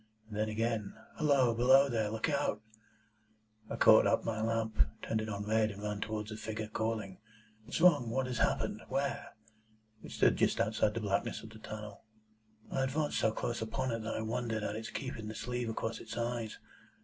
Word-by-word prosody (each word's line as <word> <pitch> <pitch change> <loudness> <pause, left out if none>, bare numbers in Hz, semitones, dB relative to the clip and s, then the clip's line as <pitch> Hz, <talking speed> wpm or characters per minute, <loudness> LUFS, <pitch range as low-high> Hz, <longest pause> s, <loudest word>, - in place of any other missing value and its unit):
And 105 - -8
then 110 +1 0
again, 110 -2 -1 0.2
'Halloa! 140 -6 +4
Below 130 +4 +6
there! 110 -5 0
Look 110 +5 -1
out!' 140 -8 0 1.1
I - - -3
caught - - +7
up - - +2
my 110 -1 -1
lamp, 110 -1 -1 0.2
turned 110 -1 0
it 110 - -4
on 100 -1 -3
red, 110 0 +2
and 100 0 -8
ran 105 0 -3
towards 105 0 -3
the 110 - -5
figure, 110 0 -4
calling, 110 -3 -3 0.5
'What's 145 - -3
wrong? 150 -10 +6
What 130 +3 0
has 125 -2 -3
happened? - - +1
Where?' - - -2 0.7
It - - -8
stood - - +3
just - - +2
outside 110 -1 +2
the 115 - -1
blackness 105 +2 -1
of 110 - -10
the 110 - -12
tunnel. 105 -1 -8 0.7
I 135 - 0
advanced 145 +3 0
so 110 - +3
close 120 +1 -3
upon 115 +4 -1
it 115 - -1
that 110 - -3
I - - -2
wondered 110 -1 -2
at 105 - -2
its 110 +1 -5
keeping 115 -5 -5
the 110 - -6
sleeve 125 0 -3
across 115 0 -3
its 110 - -7
eyes. 115 -2 -2
110 Hz, 195 wpm, -33 LUFS, 110-120 Hz, 1.1 s, caught